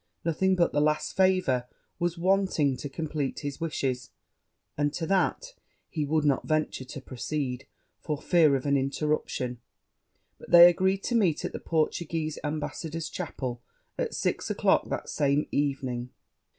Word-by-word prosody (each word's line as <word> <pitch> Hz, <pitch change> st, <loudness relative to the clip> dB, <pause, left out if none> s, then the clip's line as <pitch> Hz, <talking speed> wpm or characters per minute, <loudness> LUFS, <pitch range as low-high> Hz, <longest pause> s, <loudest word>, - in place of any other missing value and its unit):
Nothing 190 Hz, +3 st, +2 dB
but 175 Hz, -2 st, +2 dB
the 145 Hz, -, +2 dB
last 150 Hz, 0 st, 0 dB
favour 185 Hz, -10 st, +2 dB, 0.3 s
was 175 Hz, 0 st, -1 dB
wanting 185 Hz, -6 st, +2 dB
to 140 Hz, +3 st, -6 dB
compleat 150 Hz, -2 st, -3 dB
his 145 Hz, +2 st, -5 dB
wishes; 135 Hz, -5 st, -2 dB, 0.7 s
and 145 Hz, 0 st, +1 dB
to 165 Hz, -, -2 dB
that 195 Hz, -, 0 dB, 0.4 s
he 155 Hz, -4 st, -1 dB
would 155 Hz, +1 st, +1 dB
not 140 Hz, -3 st, +1 dB
venture 155 Hz, -4 st, 0 dB
to 135 Hz, +1 st, -8 dB
proceed, 130 Hz, 0 st, -4 dB, 0.3 s
for 150 Hz, -3 st, -3 dB
fear 160 Hz, -4 st, +4 dB
of 130 Hz, -, -3 dB
an 140 Hz, 0 st, +2 dB
interruption: 135 Hz, -3 st, -1 dB, 0.8 s
but -, -, -13 dB
they 170 Hz, 0 st, +10 dB
agreed 190 Hz, +2 st, +2 dB
to -, -, -2 dB
meet 190 Hz, -10 st, +2 dB
at -, -, -4 dB
the -, -, -4 dB
Portuguese 160 Hz, -1 st, -1 dB
ambassador's 155 Hz, +2 st, -4 dB
chapel 130 Hz, -8 st, -5 dB, 0.3 s
at -, -, -2 dB
six -, -, -1 dB
o'clock -, -, +2 dB
that -, -, -3 dB
same 145 Hz, 0 st, +1 dB
evening. 130 Hz, -4 st, -1 dB
150 Hz, 150 wpm, -28 LUFS, 140-170 Hz, 0.8 s, they